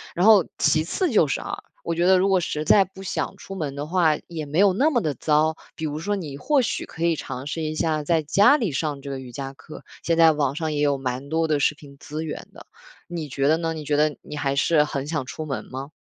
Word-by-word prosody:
“然 180 - +2
后 215 -4 +7
其 155 -1 +3
次 335 - -1
就 190 -9 +4
是 135 - -1
啊， - - -5 0.3
我 170 - -2
觉 170 +1 +1
得 190 0 +6
如 185 +2 +2
果 190 -1 +4
实 155 -3 -3
在 195 +5 +6
不 190 +1 -12
想 190 - -3
出 195 - -9
门 150 -6 -4
的 145 +1 -4
话， 160 -2 +2
也 160 -3 -5
没 145 +3 -3
有 200 -1 +5
那 275 +11 +3
么 265 -6 +2
地 155 -6 -1
糟。 155 +3 +2 0.2
比 160 - -4
如 150 0 -3
说， 205 +5 -1
你 155 -8 -6
或 285 - +2
许 - - -2
可 165 - -3
以 170 -1 +3
尝 130 -3 -6
试 160 +3 -4
一 155 0 -2
下 155 -1 0
在 160 +2 +2
家 200 - +5
里 225 - -1
上 145 0 -2
这 140 - -8
个 135 - -4
瑜 130 -2 -10
伽 135 +2 -6
课。 150 - -12 0.2
现 165 -1 +1
在 165 -1 +7
网 145 -3 0
上 160 -1 -2
也 145 - -2
有 145 -1 +2
蛮 130 +1 -4
多 160 +1 +1
的 150 -2 +1
视 145 - +2
频 140 -2 -15
资 155 +2 -5
源 155 - -6
的， - - -13 0.4
你 165 -4 -5
觉 140 +1 0
得 155 +2 +4
呢？ 165 -1 -2
你 155 -1 -7
觉 145 - +1
得 150 0 +2
你 150 - -9
还 140 -1 -1
是 150 +2 +3
很 140 -2 -4
想 150 -3 -2
出 155 +5 -6
门 140 -3 -4
吗？ 135 +2 -6
155 Hz, 290 characters per minute, -24 LUFS, 145-170 Hz, 0.4 s, 后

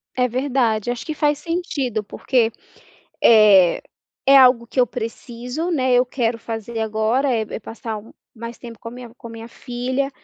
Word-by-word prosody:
É 250 -1 +2
verdade, 245 -3 0
acho 245 +4 -5
que 310 - -3
faz 295 -1 +1
sentido. 295 - -3
Porque, 230 +2 0 0.7
eh, 205 -6 +6 0.4
é 275 +1 +7
algo 250 -3 +6
que 245 - -8
eu 245 - +4
preciso, 245 +7 -5
né, 260 -6 +1
eu 245 +1 +4
quero 240 -2 -2
fazer 225 0 -6
agora, 220 +5 0
é 225 -2 +1
é 215 - -6
passar 225 +1 -6
um 215 - -14 0.2
mais 230 +1 -8
tempo 230 -2 -10
com 230 - -7
a - - -9
minha 240 -1 -11
com 235 - -11
a - - -11
minha 225 0 -9
filha. 255 +3 -3
240 Hz, 180 wpm, -21 LUFS, 225-260 Hz, 0.7 s, é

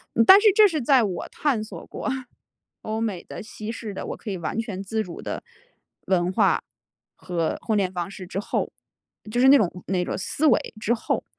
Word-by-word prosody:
嗯， 230 - +5
但 385 - +10
是 430 -1 +6
这 425 +1 +7
是 315 -7 -2
在 260 0 +4
我 185 -5 -3
探 265 -8 0
索 215 - -9
过 - - -4 0.7
欧 220 +1 -3
美 210 -6 -2
的、 - - -8
西 215 +1 -7
式 220 -3 -6
的， - - -5
我 - - -4
可 215 - -7
以 190 - -2
完 170 +5 -4
全 205 -5 -5
自 220 +3 -1
主 180 -5 -9
的 - - -4 0.6
文 180 -1 +2
化 - - +2 0.5
和 170 -3 -2
婚 220 -2 +1
恋 190 -2 +1
方 175 -1 -4
式 190 -2 -9
之 185 - -5
后， 205 - -2 0.6
就 240 - 0
是 260 - +6
那 280 - +9
种 180 -6 0
那 185 -2 0
种 - - -3
思 290 - 0
维 295 - +2
之 215 +2 0
后， 230 - -1
215 Hz, 225 characters per minute, -24 LUFS, 185-235 Hz, 0.7 s, 但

